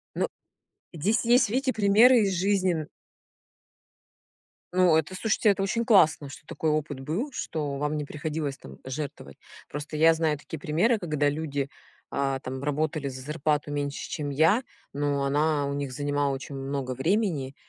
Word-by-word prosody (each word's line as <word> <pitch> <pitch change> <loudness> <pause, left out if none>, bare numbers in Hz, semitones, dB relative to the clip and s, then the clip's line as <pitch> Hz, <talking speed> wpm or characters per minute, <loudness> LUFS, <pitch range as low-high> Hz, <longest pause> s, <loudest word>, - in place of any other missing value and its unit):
Ну. - - +1 0.7
Здесь 195 +8 +1
есть, 240 -1 +4
видите, 260 +4 +1
примеры 225 +3 +6
из 195 -2 +1
жизни 190 0 +2
н 155 -2 -3 1.9
Ну 180 -3 +5
это, 160 +4 -1
слушайте, 215 +2 +2
это 195 -1 +2
очень 230 +4 0
классно, 160 - +4
что 140 - -12
такой 160 - -2
опыт 150 -2 -2
был, 170 - -3
что 150 - -3
вам 150 +2 -1
не 150 - -3
приходилось 150 -1 -4
там 65 0 -13
жертвовать. 130 - -6 0.3
Просто 145 +2 -6
я 165 +1 +6
знаю 160 -2 0
такие 150 +2 -8
примеры, 175 +12 +2
когда 150 -5 +1
люди, 145 -2 -3 0.4
а, 135 -1 0
там 130 0 -6
работали 150 0 -1
за 130 -1 -6
зарплату 150 +1 -1
меньше 145 0 -3
чем 145 -1 -3
я, 160 - +3 0.3
но 145 -1 0
она 145 +1 +1
у 140 - -2
них 140 -2 -3
занимала 145 0 0
очень 135 +1 -6
много 135 -1 -3
времени 155 - 0
150 Hz, 160 wpm, -27 LUFS, 140-185 Hz, 1.9 s, примеры